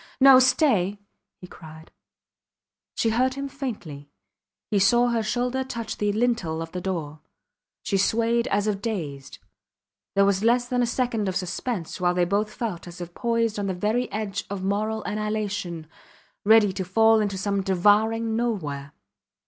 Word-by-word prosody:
No 265 -1 +8
stay! 250 - +2 0.4
he - - -8
cried. 160 -2 -13 1.0
She 225 - +1
heard 255 +3 +1
him 275 0 -4
faintly. 210 - -7 0.6
He 205 - +3
saw 240 +5 +4
her 235 -1 +1
shoulder 250 +4 -1
touch 230 -4 -5
the 205 0 +1
lintel 215 -8 0
of 165 0 -6
the 180 - -5
door. 160 -5 -4 0.6
She 195 - 0
swayed 230 +3 +1
as 200 +1 0
if 205 -2 -1
dazed. 155 -12 -5 0.8
There 200 0 +5
was 200 0 +1
less 240 +1 +3
than 250 -1 0
a 240 - +2
second 235 -4 -1
of 185 - -4
suspense 185 0 -3
while 180 0 +2
they 180 -1 +2
both 205 +4 0
felt 210 -9 -5
as 175 +1 -10
if 175 -1 -7
poised 230 -1 0
on 200 - -2
the 190 - -2
very 215 +7 -1
edge 210 0 -3
of 195 -2 -5
moral 215 +3 -1
annihilation, 205 -6 -3 0.6
ready 210 -2 +5
to 190 0 -3
fall 220 +4 +4
into 205 -2 -1
some 200 +1 -1
devouring 210 +4 +2
nowhere. 155 -12 -3
210 Hz, 160 wpm, -25 LUFS, 185-230 Hz, 1.0 s, No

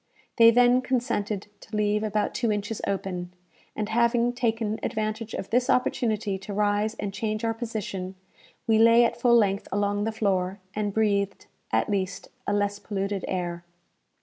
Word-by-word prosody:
They 230 -1 +9
then 245 +2 +5
consented 235 -6 -1
to 220 - -9
leave 210 0 +1
about 215 -1 -1
two 235 -3 0
inches 210 +1 -3
open, 185 -2 -3 0.4
and 215 - -2
having 235 +1 +2
taken 225 -3 -1
advantage 215 0 -3
of 195 - -6
this 245 +2 +2
opportunity 215 -5 +1
to 195 +2 -7
rise 210 +1 +1
and 200 -1 -4
change 215 +1 -2
our 225 - +1
position, 210 -5 -5 0.5
we 220 -1 +3
lay 230 +1 +7
at - - -2
full 240 -1 +5
length 200 -3 +1
along 205 +1 0
the 225 - 0
floor, 195 -3 0 0.2
and 210 -1 -1
breathed, 200 -2 0 0.3
at - - +2
least, 195 -3 -2 0.2
a - - +1
less 205 0 0
polluted 200 -1 -3
air. 175 -2 -3
210 Hz, 160 wpm, -26 LUFS, 200-230 Hz, 0.5 s, They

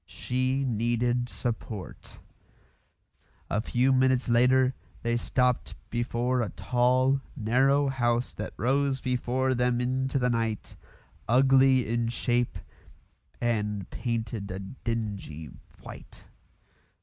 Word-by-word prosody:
She 130 +2 -1
needed 120 +1 0
support. 110 -5 -5 1.3
A 105 - +1
few 125 +4 +2
minutes 130 -1 +3
later 125 +2 +4 0.3
they 115 0 +1
stopped 125 +1 0 0.2
before 120 +1 0
a 110 - -1
tall, 130 +2 +2
narrow 135 +4 +3
house 120 -2 0
that - - -6
rose 135 +2 +1
before 130 +1 0
them 125 -1 +1
into 130 +2 0
the 125 -1 +1
night, 115 -2 -2 0.5
ugly 130 0 +5
in 115 +1 0
shape 120 +1 0 0.8
and 105 -4 -1
painted 115 -4 -3
a 95 - -4
dingy 100 - -5 0.3
white. - - -11
125 Hz, 100 wpm, -28 LUFS, 115-130 Hz, 1.3 s, ugly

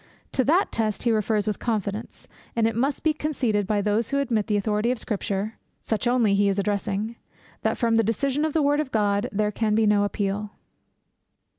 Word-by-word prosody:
To 260 - +2
that 345 +8 +3
test 215 -3 -1
he 235 - +2
refers 215 -1 +1
with 210 -2 -2
confidence; 215 -1 -3 0.3
and 230 -1 +2
it 225 -1 +1
must 270 +5 0
be 315 - +3
conceded 245 -10 -1
by 210 -1 +1
those 215 +3 +1
who 280 - 0
admit 230 -7 0
the 210 -2 +1
authority 210 +2 0
of 250 - 0
Scripture 210 0 -3 0.2
(such 220 +2 -2
only 240 -4 +3
he 200 0 +3
is 195 - 0
addressing) 205 +2 -1 0.4
that - - 0
from 235 -2 +1
the 225 0 +4
decision 270 +7 0
of 310 -1 0
the 315 - +2
word 290 +1 +3
of 300 -4 -2
God 205 -2 +1
there 210 +1 0
can 215 0 0
be 220 0 +3
no 210 -1 +4
appeal. 205 0 -2
220 Hz, 200 wpm, -25 LUFS, 205-240 Hz, 0.4 s, the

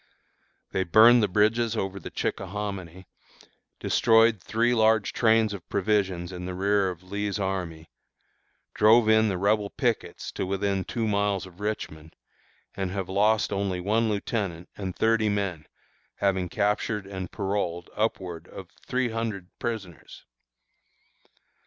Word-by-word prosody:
They 95 - 0
burned 115 +7 +7
the 105 - +3
bridges 110 +4 +2
over 95 -1 -3
the - - -8
Chickahominy, 95 -2 -4 0.7
destroyed 115 -3 +4
three 115 +5 +1
large 110 -2 +3
trains 110 -2 +3
of 95 -4 -9
provisions 95 -3 0
in 90 0 -6
the 90 - -5
rear 100 +1 +2
of 90 -1 -8
Lee's 105 0 -2
army, 90 -5 -4 0.8
drove 110 +2 +5
in 110 0 +5
the 95 - -1
Rebel 100 +2 +1
pickets - - -2
to - - -3
within 100 0 -1
two 115 -2 -2
miles 100 -2 0
of 90 0 -15
Richmond, 80 -7 -5 0.6
and 95 -1 -3
have 95 -1 -4
lost 105 +2 +2
only 95 -2 -1
one 110 +5 +1
lieutenant 100 -5 -3
and 95 -3 -5
thirty 110 -1 +2
men, 100 -6 -2 0.5
having 95 -3 0
captured 105 +1 -1
and 95 -2 -6
paroled 95 -4 -3
upwards 90 -6 -3
of 95 -2 -10 0.2
three 125 -1 0
hundred 110 -5 -4
prisoners. 105 -8 -6
100 Hz, 135 wpm, -26 LUFS, 95-110 Hz, 0.8 s, burned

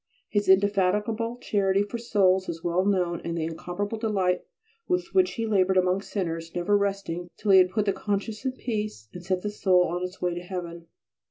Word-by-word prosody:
His 205 -2 0
indefatigable 205 +4 +2
charity 195 -2 +1
for 220 +3 -5
souls 190 -5 +2
is 165 0 -5
well 175 +1 +1
known, 180 -4 0
and 170 0 -3
the 160 - -1
incomparable 180 +6 -4
delight 190 -5 +1 0.5
with 360 -1 0
which 370 -1 +3
he 230 - -2
laboured 190 -3 +2
amongst 185 +2 +1
sinners, 165 -4 -3
never 175 +4 +2
resting 195 -4 -1
till 210 - +1
he 190 - +9
had 180 0 +5
put 210 +2 0
the 200 - +2
conscience 205 +3 -3
in 260 -1 -1
peace 215 - -4
and 180 - -8
set 185 0 -1
the 210 - -2
soul 185 -3 +3
on 175 +1 -2
its 180 0 -6
way 180 -1 0
to 175 - -5
heaven. 175 -2 -6
190 Hz, 195 wpm, -26 LUFS, 180-210 Hz, 0.5 s, he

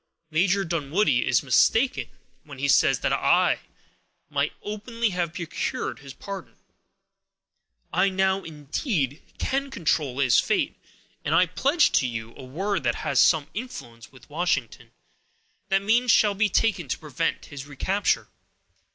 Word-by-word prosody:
Major 185 +4 +2
Dunwoodie 155 -3 +1
is 130 +1 +3
mistaken 225 - +2 0.3
when - - -11
he - - -1
says - - +4
that - - +1
I - - +3 0.7
might - - 0
openly 220 +2 -2
have 175 -2 -2
procured 175 - -3
his 140 -1 -10
pardon. 195 +5 -8 1.4
I 195 - +3
now, 190 0 +1
indeed, 150 - -3 0.2
can 275 +1 -1
control 150 - -1
his 130 -4 +4
fate, - - 0 0.5
and - - +1
I 180 - +6
pledge 275 - +2
to 130 - +2
you 115 -1 -6
a 135 - -10
word 180 +6 -2
which 120 -1 +1
has - - 0
some 155 -4 +4
influence 155 - -8
with 130 -3 -17
Washington, 135 -7 -2 0.8
that 195 0 +2
means 235 +4 +2
shall 210 -2 +5
be 210 +2 +1
taken 195 -6 +1
to - - -2
prevent 150 -5 -2
his 140 0 -7
recapture. 190 +8 0
175 Hz, 140 wpm, -25 LUFS, 140-205 Hz, 1.4 s, I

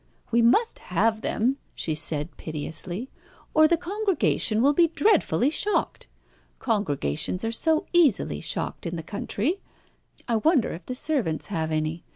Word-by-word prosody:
"We 235 0 +4
must 255 - +3
have 220 -1 0
them," 250 +6 0 0.2
she 160 - -2
said 155 +1 -1
piteously, 165 - -6 0.4
"or 310 0 +6
the 335 +1 +2
congregation 375 - 0
will 280 +5 +4
be 335 +3 +4
dreadfully 320 - +2
shocked. 410 +6 -1 0.5
Congregations 180 - -1
are 225 - -1
so 315 +6 +2
easily 270 - +3
shocked - - -2
in 170 - -4
the 165 - -5
country. 235 - -2 0.7
I 230 -2 +1
wonder 280 - +2
if 170 - -9
the 255 - -3
servants 250 - 0
have 160 -2 -1
any? 155 +2 -2
230 Hz, 145 wpm, -25 LUFS, -, 0.7 s, or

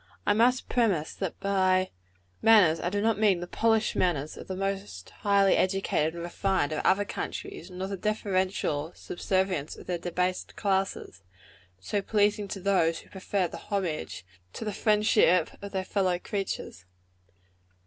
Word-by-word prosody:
I - - +4
must 245 +4 +3
premise 200 -11 +1
that 190 -4 -4
by 185 -1 +2 0.5
manners 195 -8 +6
I 175 - -1
do 205 +2 -1
not 220 -1 +1
mean 205 -5 +4
the 175 - -4
polished 225 +4 +1
manners 155 -5 0
of - - -10
the 190 - -4
most 195 - -4
highly 200 -1 +3
educated 185 -4 +1
and 170 - -5
refined 175 -3 0
of 155 - -2
other 205 +2 +3
countries, 400 - -6
nor 185 +1 -5
the 195 0 -4
deferential 185 -6 -1
subservience 185 -4 -1
of - - -12
their 175 -1 -2
debased 180 +1 -2
classes 190 - -1 0.6
so 200 - -2
pleasing 205 0 +1
to 195 - -5
those 180 -4 +2
who - - -21
prefer 190 -1 -1
the - - -8
homage 165 - -3 0.3
to 225 - -6
the 210 - -2
friendship 210 -5 +3
of 200 0 -7
their 190 -1 -2
fellow 185 -3 +1
creatures. 185 - -5
190 Hz, 155 wpm, -28 LUFS, 175-205 Hz, 0.6 s, manners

